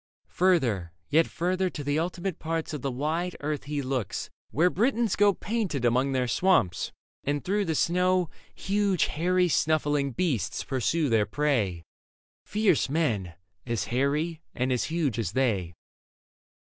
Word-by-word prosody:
Further, 120 Hz, -, +1 dB, 0.2 s
yet 160 Hz, +2 st, +4 dB
further, 185 Hz, +2 st, 0 dB
to 150 Hz, -, -6 dB
the 145 Hz, +2 st, 0 dB
ultimate 175 Hz, +2 st, -3 dB
parts 160 Hz, 0 st, -3 dB
Of 150 Hz, -, -4 dB
the 140 Hz, -, -1 dB
wide 155 Hz, +7 st, -2 dB
earth 150 Hz, -1 st, -3 dB
he 145 Hz, -1 st, -2 dB
looks, 130 Hz, -6 st, -3 dB, 0.2 s
where 175 Hz, +5 st, +3 dB
Britons 230 Hz, 0 st, +1 dB
go 205 Hz, 0 st, +5 dB
Painted 195 Hz, -, -2 dB
among 130 Hz, +3 st, +2 dB
their 130 Hz, -2 st, 0 dB
swamps, 120 Hz, -, +2 dB, 0.3 s
and 145 Hz, +2 st, -2 dB
through 200 Hz, +2 st, +1 dB
the 160 Hz, -2 st, -1 dB
snow 180 Hz, +2 st, +2 dB, 0.3 s
Huge 200 Hz, -2 st, +1 dB
hairy 180 Hz, +3 st, +1 dB
snuffling 150 Hz, -3 st, +1 dB
beasts 135 Hz, -, -1 dB
pursue 145 Hz, +5 st, 0 dB
their 110 Hz, -4 st, +2 dB
prey 115 Hz, -, 0 dB, 0.3 s
— -, -, -89 dB
Fierce 205 Hz, -10 st, +2 dB
men, 110 Hz, -, 0 dB, 0.3 s
as 115 Hz, -3 st, -1 dB
hairy 150 Hz, +5 st, 0 dB
and 125 Hz, +1 st, 0 dB
as 125 Hz, -, +1 dB
huge 155 Hz, -8 st, -1 dB
as 105 Hz, -4 st, -2 dB
they. 110 Hz, -10 st, +1 dB
150 Hz, 145 wpm, -27 LUFS, 130-180 Hz, 0.3 s, go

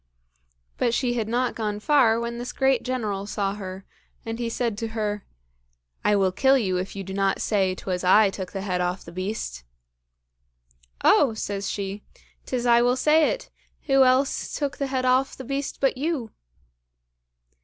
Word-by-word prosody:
But 235 Hz, -, +2 dB
she 245 Hz, -2 st, 0 dB
had 225 Hz, -3 st, -1 dB
not 245 Hz, +2 st, 0 dB
gone 210 Hz, -2 st, -3 dB
far 230 Hz, -3 st, +4 dB
when 235 Hz, 0 st, -4 dB
this 245 Hz, -, -5 dB
great 265 Hz, -2 st, +2 dB
General 210 Hz, -6 st, -3 dB
saw 200 Hz, -2 st, -1 dB
her, 190 Hz, -2 st, -7 dB, 0.4 s
and 225 Hz, +1 st, -4 dB
he 235 Hz, -1 st, -1 dB
said 230 Hz, -2 st, -1 dB
to 225 Hz, -, -2 dB
her, 210 Hz, -1 st, -2 dB, 0.8 s
"I 210 Hz, -, +3 dB
will 190 Hz, -2 st, +2 dB
kill 265 Hz, +7 st, +4 dB
you 190 Hz, -7 st, 0 dB
if 185 Hz, +2 st, -4 dB
you 195 Hz, -, -4 dB
do 190 Hz, 0 st, -7 dB
not 195 Hz, 0 st, +1 dB
say 190 Hz, -3 st, +1 dB
'twas 185 Hz, -1 st, -4 dB
I 200 Hz, +2 st, +5 dB
took 190 Hz, -2 st, -6 dB
the 195 Hz, -, -4 dB
head 180 Hz, -2 st, -1 dB
off 180 Hz, +1 st, -2 dB
the 170 Hz, -, -10 dB
beast." 185 Hz, -, -4 dB, 1.4 s
"Oh!" 255 Hz, -7 st, +5 dB
says 200 Hz, -2 st, -3 dB
she, 200 Hz, 0 st, -4 dB, 0.5 s
"'tis 250 Hz, -2 st, -2 dB
I 235 Hz, 0 st, +5 dB
will 245 Hz, +1 st, +3 dB
say 305 Hz, +3 st, +4 dB
it; -, -, -5 dB, 0.3 s
who 270 Hz, -2 st, +4 dB
else 260 Hz, +2 st, +1 dB
took 285 Hz, -2 st, -2 dB
the 280 Hz, -, -1 dB
head 260 Hz, -1 st, -1 dB
off 255 Hz, +1 st, +2 dB
the 265 Hz, -, -7 dB
beast 275 Hz, +2 st, -3 dB
but 270 Hz, -, +2 dB
you!" 280 Hz, -6 st, -2 dB
225 Hz, 175 wpm, -25 LUFS, 195-255 Hz, 1.4 s, I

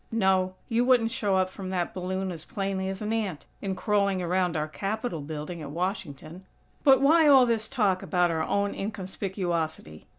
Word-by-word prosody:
No. 190 Hz, -4 st, +2 dB
You 235 Hz, +1 st, +2 dB
wouldn't 245 Hz, -3 st, +3 dB
show 200 Hz, -4 st, 0 dB
up 185 Hz, 0 st, +1 dB
from 190 Hz, -1 st, -7 dB
that 180 Hz, -2 st, -2 dB
balloon 185 Hz, +1 st, -3 dB
as 165 Hz, -3 st, -7 dB
plainly 195 Hz, 0 st, -3 dB
as 195 Hz, +2 st, -5 dB
an 215 Hz, +1 st, -1 dB
ant, 205 Hz, -9 st, -2 dB, 0.2 s
in 195 Hz, -1 st, -2 dB
crawling 200 Hz, -2 st, +1 dB
around 180 Hz, -1 st, 0 dB
our 150 Hz, 0 st, -1 dB
Capitol 195 Hz, +1 st, -3 dB
building 155 Hz, +3 st, -6 dB
at 145 Hz, -, -6 dB
Washington. 170 Hz, 0 st, -4 dB, 0.4 s
But 270 Hz, -2 st, +6 dB
why 315 Hz, +2 st, +6 dB
all 270 Hz, -3 st, +7 dB
this 225 Hz, -2 st, 0 dB
talk 205 Hz, -8 st, +1 dB
about 180 Hz, -2 st, +1 dB
our 160 Hz, -1 st, -1 dB
own 200 Hz, +5 st, 0 dB
inconspicuosity? 185 Hz, -, -4 dB
190 Hz, 175 wpm, -27 LUFS, 175-215 Hz, 0.4 s, all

